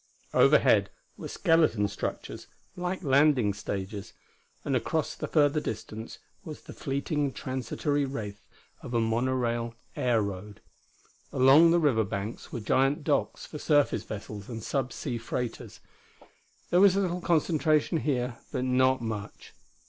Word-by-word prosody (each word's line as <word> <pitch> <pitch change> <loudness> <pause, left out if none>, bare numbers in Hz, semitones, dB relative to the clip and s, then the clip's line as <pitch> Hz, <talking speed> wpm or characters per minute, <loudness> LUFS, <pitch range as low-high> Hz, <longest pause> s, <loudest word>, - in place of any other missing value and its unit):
Overhead - - +5 0.3
were - - -7
skeleton 155 - +2
structures, - - -5 0.3
like 180 +1 -3
landing 135 -6 +4
stages; 100 0 -5 0.5
and 135 - 0
across 150 +6 -1
the - - -5
further 150 -1 +3
distance 110 -3 -6 0.3
was 155 -2 -8
the - - -11
fleeting, 140 +1 -2
transitory 130 +3 -2
wraith 105 -7 -5 0.4
of 120 - -6
a - - +3
monorail 120 0 0 0.2
air 120 -2 +2
road. 100 +1 -6 0.7
Along 140 +6 +6
the 170 - +4
river 135 -9 +3
banks 100 +2 -5
were 120 - -4
giant 135 +7 +1
docks - - 0
for 150 - -8
surface 145 -2 +2
vessels 105 -1 -8
and 115 -2 -6
sub 130 0 -1
sea 120 -5 -4
freighters. 120 +1 -5 0.9
There 175 +1 +5
was 195 -2 +6
a - - +2
little 180 -2 -1
concentration 160 -1 +2
here, 125 -5 -2
but 125 - -2
not 130 0 +2
much. 105 -2 -6
130 Hz, 135 wpm, -28 LUFS, 110-150 Hz, 0.9 s, Along